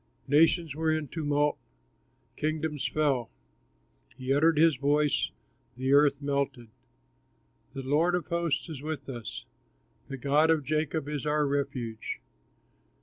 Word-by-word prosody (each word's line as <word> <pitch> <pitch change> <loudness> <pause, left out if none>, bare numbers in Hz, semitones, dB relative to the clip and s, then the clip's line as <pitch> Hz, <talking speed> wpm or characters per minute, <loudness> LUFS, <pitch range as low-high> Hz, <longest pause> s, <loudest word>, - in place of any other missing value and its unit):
Nations 160 +2 +3
were 160 +2 -1
in 155 -3 -1
tumult, 145 -2 0 0.8
kingdoms 155 -1 -2
fell, 140 -6 0 0.9
He 130 0 -1
uttered 160 +2 +4
his 160 -1 +5
voice, 145 +2 +1 0.5
the 130 +2 +1
earth 145 -1 +4
melted. 140 -4 -2 1.0
The 135 -2 -5
Lord 155 +6 +2
of 180 - -2
hosts 170 -3 -1
is 155 -5 -7
with 150 -2 -5
us, 120 -5 -6 0.6
The 135 - -6
God 145 +5 +3
of 160 -3 +3
Jacob 155 +1 -1
is 150 0 -3
our 150 0 +2
refuge. 130 -5 -3
145 Hz, 125 wpm, -29 LUFS, 140-155 Hz, 1.0 s, his